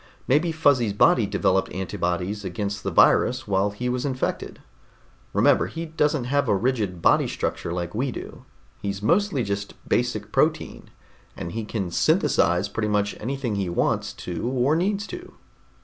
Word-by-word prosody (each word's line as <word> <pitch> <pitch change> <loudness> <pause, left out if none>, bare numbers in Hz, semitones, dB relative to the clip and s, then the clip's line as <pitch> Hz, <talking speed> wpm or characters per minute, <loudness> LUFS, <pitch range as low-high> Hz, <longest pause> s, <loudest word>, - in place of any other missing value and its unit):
"Maybe 155 +6 +3
Fuzzy's 140 -9 +2
body 105 +1 +4
developed 95 -1 +1
antibodies 90 +2 -2
against 100 +2 -3
the - - -2
virus - - +3
while 100 0 +2
he 105 +5 -4
was 125 0 -1
infected. 130 -2 -3 0.7
Remember, - - +3
he 165 +1 -5
doesn't 150 -3 0
have 140 0 0
a 100 - +4
rigid 105 -6 -1
body - - +4
structure - - -3
like 85 0 -3
we 125 +4 -1
do. - - -9 0.4
He's 100 0 -4
mostly 175 - +2
just 100 -1 -4
basic - - -1
protein, - - 0 0.5
and 85 - -5
he 115 +3 -4
can 100 -5 -3
synthesize 90 +2 +2
pretty 105 +1 -2
much 105 -1 0
anything 130 0 -3
he 100 -3 -1
wants 85 - 0
to 90 +6 -5
or 130 +3 +2
needs 200 +4 0
to." 360 +5 -9
105 Hz, 155 wpm, -24 LUFS, 100-135 Hz, 0.7 s, body